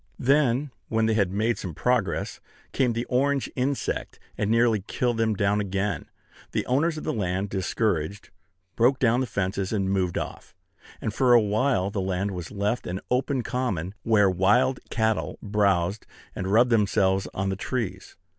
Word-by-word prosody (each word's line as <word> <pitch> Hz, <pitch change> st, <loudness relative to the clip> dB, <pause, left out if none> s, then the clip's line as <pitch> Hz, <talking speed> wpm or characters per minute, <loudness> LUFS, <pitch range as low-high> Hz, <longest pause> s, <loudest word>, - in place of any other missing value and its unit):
Then, 135 Hz, 0 st, +2 dB, 0.2 s
when 110 Hz, 0 st, +1 dB
they 110 Hz, -, +2 dB
had 100 Hz, -4 st, +1 dB
made 110 Hz, +2 st, 0 dB
some 90 Hz, -6 st, -6 dB
progress, 125 Hz, -1 st, 0 dB, 0.3 s
came 125 Hz, -3 st, +1 dB
the 120 Hz, +2 st, -2 dB
orange 135 Hz, +2 st, 0 dB
insect, 135 Hz, +2 st, -2 dB, 0.2 s
and 105 Hz, -, -1 dB
nearly 115 Hz, -2 st, +3 dB
killed 120 Hz, -2 st, 0 dB
them 110 Hz, -1 st, +1 dB
down 100 Hz, +1 st, +1 dB
again. 100 Hz, 0 st, -2 dB, 0.4 s
The -, -, 0 dB
owners 155 Hz, +6 st, +1 dB
of -, -, -6 dB
the -, -, -1 dB
land, 95 Hz, -1 st, -2 dB
discouraged, 95 Hz, -1 st, -1 dB, 0.4 s
broke 125 Hz, +3 st, +3 dB
down 120 Hz, -1 st, +3 dB
the 130 Hz, -, -1 dB
fences, 95 Hz, -2 st, -2 dB
and 95 Hz, -3 st, 0 dB
moved 95 Hz, -3 st, 0 dB
off; -, -, -6 dB, 0.5 s
and 110 Hz, -, -2 dB
for 125 Hz, +1 st, +4 dB
a 120 Hz, -, +8 dB
while 105 Hz, -1 st, +1 dB
the 100 Hz, -, -2 dB
land 95 Hz, +1 st, -1 dB
was 90 Hz, -3 st, -6 dB
left 105 Hz, +4 st, -2 dB
an 90 Hz, +2 st, -3 dB
open 130 Hz, 0 st, +1 dB
common, 100 Hz, -, -2 dB
where 110 Hz, -3 st, +4 dB
wild 100 Hz, +8 st, +3 dB
cattle 110 Hz, -1 st, 0 dB
browsed, 100 Hz, -2 st, 0 dB, 0.3 s
and 95 Hz, -, -3 dB
rubbed 120 Hz, +3 st, +4 dB
themselves 95 Hz, -3 st, +2 dB
on 95 Hz, 0 st, -1 dB
the 95 Hz, -, -1 dB
trees. 95 Hz, -3 st, -4 dB
105 Hz, 165 wpm, -26 LUFS, 95-125 Hz, 0.5 s, a